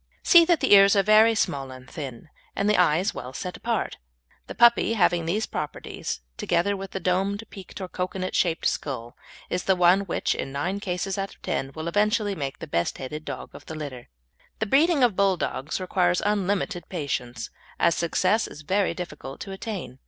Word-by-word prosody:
See 345 Hz, -2 st, +7 dB
that 340 Hz, -2 st, +2 dB
the -, -, +4 dB
ears 200 Hz, 0 st, +8 dB
are 200 Hz, -, +4 dB
very 215 Hz, +2 st, +6 dB
small 135 Hz, -9 st, -1 dB
and 130 Hz, 0 st, -11 dB
thin, 140 Hz, 0 st, -8 dB, 0.3 s
and 200 Hz, -, 0 dB
the 210 Hz, -, +4 dB
eyes 180 Hz, +2 st, +3 dB
set -, -, -5 dB
well 130 Hz, +1 st, -7 dB, 0.2 s
apart. 230 Hz, -3 st, -2 dB, 0.5 s
The -, -, -7 dB
puppy 235 Hz, -1 st, +5 dB
having 175 Hz, -5 st, +2 dB
these 210 Hz, +6 st, 0 dB
properties, 150 Hz, -, -5 dB, 0.2 s
together 200 Hz, +4 st, +1 dB
with 195 Hz, 0 st, -8 dB
a -, -, -1 dB
domed, 195 Hz, +4 st, 0 dB
peaked, 195 Hz, 0 st, -10 dB
or 190 Hz, -, -4 dB
"cocoanut" 185 Hz, +1 st, -4 dB
shaped 170 Hz, -3 st, +1 dB
skull, 120 Hz, -4 st, -2 dB, 0.3 s
is 180 Hz, -, -3 dB
the 190 Hz, -, +4 dB
one 180 Hz, +1 st, +5 dB
which, -, -, 0 dB
in 135 Hz, -, -4 dB
nine 175 Hz, +9 st, -2 dB
cases 195 Hz, 0 st, -3 dB
out 195 Hz, 0 st, -4 dB
of -, -, -33 dB
ten, 135 Hz, -, -2 dB
will 160 Hz, +1 st, -5 dB
eventually 210 Hz, +3 st, +1 dB
make 140 Hz, -7 st, -4 dB
the -, -, -7 dB
best 85 Hz, -, -1 dB
headed 150 Hz, +4 st, -6 dB
dog -, -, -7 dB
of -, -, -13 dB
the 160 Hz, -, -6 dB
litter. 140 Hz, -5 st, -7 dB, 0.5 s
The 220 Hz, -, -1 dB
breeding 290 Hz, -, +3 dB
of 235 Hz, -6 st, +3 dB
Bulldogs 185 Hz, -7 st, 0 dB
requires 180 Hz, -1 st, +1 dB
unlimited 200 Hz, -3 st, -1 dB
patience, 140 Hz, -8 st, -4 dB, 0.3 s
as 170 Hz, -, +4 dB
success 185 Hz, +7 st, +1 dB
is 155 Hz, -, -11 dB
very 190 Hz, +2 st, +1 dB
difficult 150 Hz, -6 st, -7 dB
to 195 Hz, -, -6 dB
attain. 195 Hz, -, -6 dB
185 Hz, 190 wpm, -25 LUFS, 155-200 Hz, 0.5 s, ears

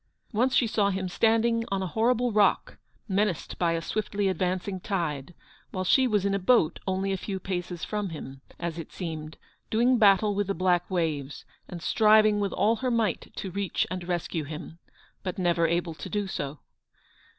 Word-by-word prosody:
Once 250 Hz, +5 st, +2 dB
she 245 Hz, -, +4 dB
saw 210 Hz, -2 st, +1 dB
him 190 Hz, -1 st, -2 dB
standing 230 Hz, +4 st, +2 dB
on 195 Hz, -1 st, 0 dB
a 185 Hz, -, -5 dB
horrible 240 Hz, +2 st, +2 dB
rock, 210 Hz, -1 st, +2 dB, 0.3 s
menaced 200 Hz, -3 st, -1 dB
by 170 Hz, -2 st, +2 dB
a 165 Hz, -, -1 dB
swiftly 205 Hz, +1 st, -1 dB
advancing 185 Hz, +1 st, -1 dB
tide, 170 Hz, -6 st, -3 dB, 0.3 s
while 185 Hz, -, -3 dB
she 260 Hz, +8 st, +4 dB
was 210 Hz, -4 st, +1 dB
in 200 Hz, -, +1 dB
a 200 Hz, -, +1 dB
boat 190 Hz, -4 st, +3 dB
only 190 Hz, +1 st, 0 dB
a 190 Hz, -, 0 dB
few 190 Hz, 0 st, -4 dB
paces 180 Hz, -2 st, -4 dB
from 210 Hz, -2 st, -2 dB
him, 135 Hz, -4 st, -8 dB, 0.2 s
as 170 Hz, -1 st, -4 dB
it 165 Hz, -, -8 dB
seemed, 160 Hz, -3 st, -6 dB, 0.3 s
doing 240 Hz, +2 st, +3 dB
battle 205 Hz, 0 st, +5 dB
with 205 Hz, -1 st, -1 dB
the 195 Hz, -, -1 dB
black 180 Hz, -1 st, +1 dB
waves, 155 Hz, -6 st, -2 dB, 0.2 s
and 175 Hz, -2 st, -8 dB
striving 215 Hz, -1 st, +5 dB
with 200 Hz, -1 st, 0 dB
all 220 Hz, +3 st, +2 dB
her 255 Hz, +3 st, -1 dB
might 225 Hz, -6 st, 0 dB
to 190 Hz, -, -5 dB
reach 195 Hz, -1 st, -1 dB
and 180 Hz, -1 st, -4 dB
rescue 175 Hz, -2 st, -2 dB
him, 160 Hz, +3 st, -8 dB, 0.4 s
but 185 Hz, -2 st, -4 dB
never 175 Hz, -2 st, +2 dB
able 170 Hz, 0 st, -1 dB
to -, -, -8 dB
do 205 Hz, -1 st, -1 dB
so. 145 Hz, -6 st, -4 dB
190 Hz, 185 wpm, -27 LUFS, 170-210 Hz, 0.4 s, battle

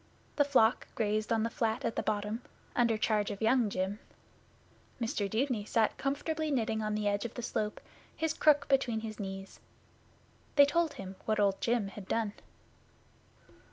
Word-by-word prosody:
The 290 Hz, -, +6 dB
flock 255 Hz, -5 st, +3 dB
grazed 215 Hz, 0 st, 0 dB
on 225 Hz, -1 st, +2 dB
the 230 Hz, -, 0 dB
flat 225 Hz, -4 st, -1 dB
at 230 Hz, -, -1 dB
the -, -, 0 dB
bottom, 210 Hz, +2 st, -2 dB, 0.3 s
under 235 Hz, -2 st, +3 dB
charge 215 Hz, -1 st, +1 dB
of 200 Hz, -2 st, -5 dB
Young 225 Hz, 0 st, +3 dB
Jim. 195 Hz, +2 st, -2 dB, 1.0 s
Mr 225 Hz, -4 st, -1 dB
Dudeney 230 Hz, 0 st, 0 dB
sat 220 Hz, +1 st, +1 dB
comfortably 310 Hz, +3 st, -1 dB
knitting 225 Hz, -5 st, 0 dB
on 215 Hz, 0 st, -1 dB
the 210 Hz, -1 st, 0 dB
edge 205 Hz, 0 st, +1 dB
of 235 Hz, -, -6 dB
the 245 Hz, -, -5 dB
slope, 210 Hz, -1 st, -2 dB, 0.4 s
his 320 Hz, -1 st, 0 dB
crook 290 Hz, -2 st, +4 dB
between 255 Hz, -5 st, +2 dB
his 220 Hz, -1 st, -6 dB
knees. 195 Hz, -1 st, -6 dB, 1.0 s
They 285 Hz, -1 st, +9 dB
told 320 Hz, +1 st, +1 dB
him 190 Hz, 0 st, -8 dB
what 215 Hz, -1 st, +1 dB
Old 200 Hz, -1 st, +2 dB
Jim 230 Hz, -4 st, +1 dB
had 195 Hz, -1 st, -10 dB
done. 220 Hz, -3 st, 0 dB
220 Hz, 165 wpm, -32 LUFS, 210-255 Hz, 1.0 s, They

